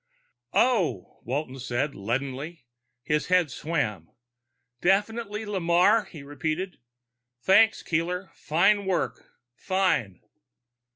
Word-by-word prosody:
"Oh," 185 - +1
Walton 135 +1 -3
said 130 +3 -2
leadenly. 135 +7 -4 0.4
His 150 +2 0
head 180 -5 +3
swam. 105 - -2 0.7
"Definitely 210 +3 0
Lamarre," 190 +2 +3
he 155 -7 -11
repeated. 155 +6 -3 0.6
"Thanks, 210 +5 +5
Keeler. 180 +3 -2
Fine 195 +6 +2
work. 185 -2 -2 0.2
Fine." 185 - 0
170 Hz, 90 wpm, -26 LUFS, 135-195 Hz, 0.7 s, Thanks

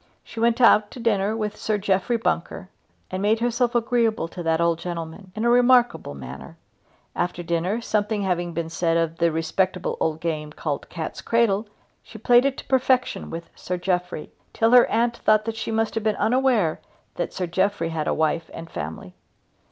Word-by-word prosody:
She 225 - -9
went 235 +1 +2
out 215 -3 +5
to - - -10
dinner 215 -2 +1
with 210 -1 -3
Sir 215 -1 -1
Jeffrey 195 +4 +1
Bunker, 185 -4 -2 0.4
and 185 0 -3
made 215 +2 +2
herself 240 +1 0
agreeable 230 -4 +1
to 175 - -7
that 165 -1 +1
old 170 -1 +2
gentleman 170 +2 -6
in 220 +2 -2
a - - +4
remarkable 245 - +3
manner. 70 -2 -9 0.6
After 175 0 -2
dinner, 170 +7 -1
something 210 -2 -1
having 175 -2 -1
been 170 0 -3
said 165 0 +1
of 165 -1 -1
the 170 -1 +3
respectable 180 +3 -1
old 160 -1 0
game 155 -2 -3
called 150 -3 -4
cat's 160 -2 -5
cradle, 225 -2 +1 0.3
she 220 - -12
played 240 +3 +4
it 275 -1 0
to - - -8
perfection 260 -1 +1
with 165 0 -7
Sir 180 - -4
Jeffrey, 180 -3 -2 0.2
till 225 0 +2
her 250 -1 +7
aunt 235 +1 +1
thought 215 0 +3
that 225 -1 -3
she 225 - -4
must 225 0 0
have 225 - -2
been 215 -1 +1
unaware 240 -8 +2 0.3
that - - -3
Sir 185 - -3
Jeffrey 180 0 0
had 160 -2 -3
a - - +2
wife 160 +1 0
and 165 - -9
family. 80 +4 -6
195 Hz, 185 wpm, -24 LUFS, 170-230 Hz, 0.6 s, her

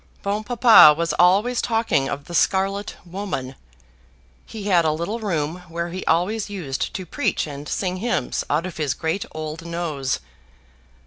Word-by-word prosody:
Bon 205 +2 -1
Papa 230 -10 +7
was 170 -1 0
always 205 +8 +4
talking 225 - +1
of 145 - -5
the 175 - -10
scarlet 195 +3 +1
woman. 175 -8 -5 0.9
He 220 -3 -8
had 185 -4 +3
a 155 - +2
little 170 +9 -3
room 165 -6 -2
where 170 +1 -3
he 185 +2 -5
always 200 +7 +1
used 165 -10 -3
to 185 - -4
preach - - -1
and 145 -1 -8
sing 185 -1 -2
hymns 210 - -1
out 155 +4 +1
of 185 - -7
his 145 -5 -1
great 160 +5 -2
old 155 +1 -6
nose. 165 -6 -2
175 Hz, 155 wpm, -22 LUFS, 155-200 Hz, 0.9 s, Papa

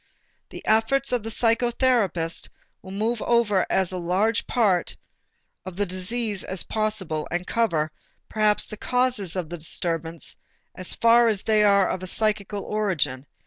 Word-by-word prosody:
The - - -10
efforts 245 +5 +2
of 245 -2 +1
the 225 - -6
psychotherapist 230 -7 +1 0.3
will 190 - -12
move 215 +4 -2
over 225 -5 +2
as 190 -1 +1
large 185 +6 +1
a - - -26
part 200 -8 +1 0.7
of 185 -2 -8
the 205 +2 0
disease 200 +3 -2
as 190 -1 +1
possible 210 -8 -2
and 175 +1 -2
cover, 165 -11 0 0.4
perhaps, 215 -1 +2
the 215 - -7
causes 250 -7 0
of 175 -3 -4
the 175 - -5
disturbance 165 0 -3 0.4
as 185 - 0
far 235 +1 +5
as 210 -4 0
they 215 -1 +3
are 200 -2 +4
of 185 0 -3
psychical 210 -2 -1
origin. 150 -11 -2
205 Hz, 145 wpm, -24 LUFS, 180-225 Hz, 0.7 s, far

